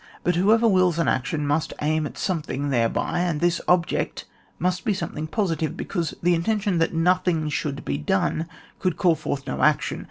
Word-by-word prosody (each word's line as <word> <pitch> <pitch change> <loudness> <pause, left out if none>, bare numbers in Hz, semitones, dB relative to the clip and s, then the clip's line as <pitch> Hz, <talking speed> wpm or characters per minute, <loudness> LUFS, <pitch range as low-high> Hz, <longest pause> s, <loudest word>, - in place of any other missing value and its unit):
But 180 - +1
whoever 220 +6 +4
wills 185 -5 +3
an 165 - +1
action 145 +4 0
must 145 +2 0
aim 155 0 0
at - - -11
something 150 -6 -2
thereby, 120 +6 0
and 175 -4 0
this 175 +1 +1
ob 175 -1 +4
ject - - -3 0.3
must 180 +2 -1
be 215 -5 +1
something 155 -4 -4
pMitive^ 165 -4 -1
because 170 -5 -3
the 175 +1 +4
intention 195 +1 0
that 165 - +2
nothing 170 -2 +1
should 145 -1 -3
he 70 0 -1
done, 95 - 0 0.3
could 180 -3 -1
call 175 -3 +4
forth 140 -3 -4
no 65 - -3
action. - - +2
165 Hz, 185 wpm, -24 LUFS, 150-180 Hz, 0.3 s, whoever